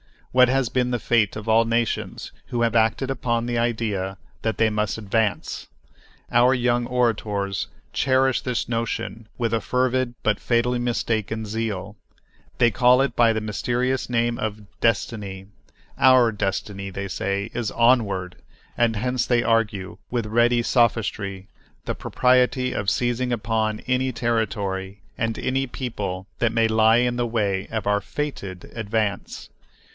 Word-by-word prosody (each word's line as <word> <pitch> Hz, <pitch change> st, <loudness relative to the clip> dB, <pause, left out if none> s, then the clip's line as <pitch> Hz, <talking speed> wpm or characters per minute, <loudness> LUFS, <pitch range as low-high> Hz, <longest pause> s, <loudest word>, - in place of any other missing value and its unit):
What 125 Hz, 0 st, +6 dB
has 135 Hz, -2 st, +1 dB
been 125 Hz, -1 st, 0 dB
the 125 Hz, -, 0 dB
fate 110 Hz, -3 st, +1 dB
of 110 Hz, +1 st, -7 dB
all 115 Hz, +1 st, +4 dB
nations 115 Hz, 0 st, -2 dB, 0.2 s
who 120 Hz, -, -2 dB
have 115 Hz, -1 st, +1 dB
acted 115 Hz, +4 st, +2 dB
upon 120 Hz, -2 st, -1 dB
the 120 Hz, 0 st, -1 dB
idea 110 Hz, -5 st, -1 dB, 0.3 s
that 110 Hz, -1 st, -1 dB
they 110 Hz, -1 st, +3 dB
must 105 Hz, -1 st, -1 dB
advance! 110 Hz, 0 st, -1 dB, 0.6 s
Our 120 Hz, +2 st, +5 dB
young 120 Hz, -1 st, +1 dB
orators 105 Hz, -5 st, 0 dB, 0.3 s
cherish 130 Hz, -1 st, +2 dB
this 125 Hz, -2 st, -2 dB
notion 115 Hz, -1 st, -3 dB
with 115 Hz, -2 st, -1 dB
a 115 Hz, -, +1 dB
fervid 130 Hz, -1 st, 0 dB
but 105 Hz, -2 st, +1 dB
fatally 120 Hz, +1 st, +1 dB
mistaken 110 Hz, -2 st, -1 dB
zeal. 105 Hz, -2 st, -4 dB, 0.6 s
They 120 Hz, -2 st, +4 dB
call 125 Hz, +3 st, +5 dB
it 135 Hz, -, 0 dB
by 115 Hz, -1 st, +4 dB
the 110 Hz, -, -2 dB
mysterious 120 Hz, +5 st, -1 dB
name 120 Hz, -1 st, 0 dB
of 110 Hz, 0 st, -3 dB, 0.2 s
"destiny." 100 Hz, -4 st, -1 dB, 0.5 s
"Our 130 Hz, -3 st, +6 dB
destiny," 100 Hz, -1 st, -3 dB
they 95 Hz, +1 st, -5 dB
say, 100 Hz, +3 st, -2 dB
is 120 Hz, -3 st, -2 dB
"onward," 105 Hz, -7 st, +2 dB, 0.4 s
and 115 Hz, -1 st, +2 dB
hence 125 Hz, +3 st, -1 dB
they 120 Hz, -1 st, +3 dB
argue, 105 Hz, -5 st, 0 dB
with 120 Hz, -2 st, -1 dB
ready 120 Hz, +2 st, +3 dB
sophistry, 105 Hz, -5 st, 0 dB, 0.4 s
the -, -, -1 dB
propriety 125 Hz, 0 st, +2 dB
of 100 Hz, -, 0 dB
seizing 120 Hz, 0 st, 0 dB
upon 110 Hz, -1 st, -1 dB
any 130 Hz, 0 st, 0 dB
territory 100 Hz, -5 st, -2 dB, 0.2 s
and 115 Hz, -1 st, -1 dB
any 135 Hz, +1 st, -1 dB
people 100 Hz, -8 st, -4 dB
that 115 Hz, -1 st, +1 dB
may 115 Hz, -1 st, +3 dB
lie 110 Hz, +1 st, +5 dB
in 120 Hz, 0 st, +1 dB
the 120 Hz, -1 st, 0 dB
way 100 Hz, -4 st, -1 dB
of 110 Hz, -3 st, -3 dB
our 105 Hz, 0 st, +2 dB
"fated" 100 Hz, -9 st, -5 dB
advance. 110 Hz, -2 st, -2 dB
115 Hz, 145 wpm, -23 LUFS, 105-120 Hz, 0.6 s, What